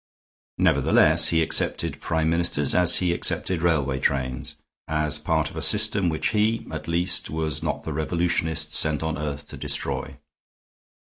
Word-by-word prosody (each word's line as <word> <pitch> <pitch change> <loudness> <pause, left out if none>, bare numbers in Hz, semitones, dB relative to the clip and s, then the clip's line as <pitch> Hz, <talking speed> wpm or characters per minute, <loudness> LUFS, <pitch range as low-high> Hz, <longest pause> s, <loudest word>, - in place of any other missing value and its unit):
Nevertheless, - - +4
he 80 -1 +3
accepted - - -1
Prime 80 -1 0
Ministers 85 -4 +1
as 90 -1 +4
he 90 -2 +1
accepted 85 0 -1
railway 70 -6 +1
trains 65 -2 -2 0.3
as 75 -1 0
part 80 -1 -1
of - - -13
a - - -4
system 105 -4 +2
which 80 -1 -1
he, 110 +1 0
at 80 0 -6
least, 85 +2 0
was 80 -2 -2
not - - -3
the 80 - -4
revolutionist 80 +1 -1
sent 80 0 +1
on 80 0 -2
earth 75 -1 -5
to - - -8
destroy. - - -3
80 Hz, 150 wpm, -24 LUFS, 75-85 Hz, 0.3 s, Nevertheless